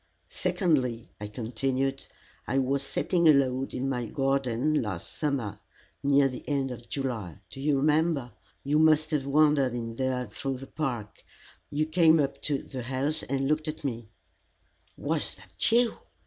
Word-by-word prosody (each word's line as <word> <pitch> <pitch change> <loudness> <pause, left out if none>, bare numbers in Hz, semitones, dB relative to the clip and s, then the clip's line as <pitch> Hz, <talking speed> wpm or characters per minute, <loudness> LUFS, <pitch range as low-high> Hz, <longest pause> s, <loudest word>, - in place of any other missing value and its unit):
"Secondly," 130 - 0
I 105 - -5
continued, 130 +5 -2 0.4
"I 135 - 0
was 135 +1 +1
sitting 170 +4 +1
alone 135 -2 +3
in 135 - -3
my 125 -3 -1
garden 135 +2 +1
last 95 -6 -5
summer 125 -9 -2 0.4
near 140 -1 +4
the 130 -2 -6
end 135 -2 0
of 120 -1 -9
July 120 - -3
do 135 - -8
you 145 0 +2
remember? 150 -2 +2 0.3
You 145 +2 +2
must 155 0 +4
have 140 -3 0
wandered 145 -3 +4
in 115 -1 -5
there 130 -1 0
through 130 +5 -4
the 135 - -8
park; 125 -8 -4 0.5
you 150 +1 0
came 160 0 +5
up 140 -2 -1
to 145 -3 -1
the 130 -2 -6
house 135 +5 0
and 135 0 -1
looked 155 +2 0
at 155 0 -5
me 120 -5 -4 0.4
" - - -36
"Was - - 0
that - - -2
you?" 235 0 +3
135 Hz, 160 wpm, -28 LUFS, 125-150 Hz, 0.5 s, came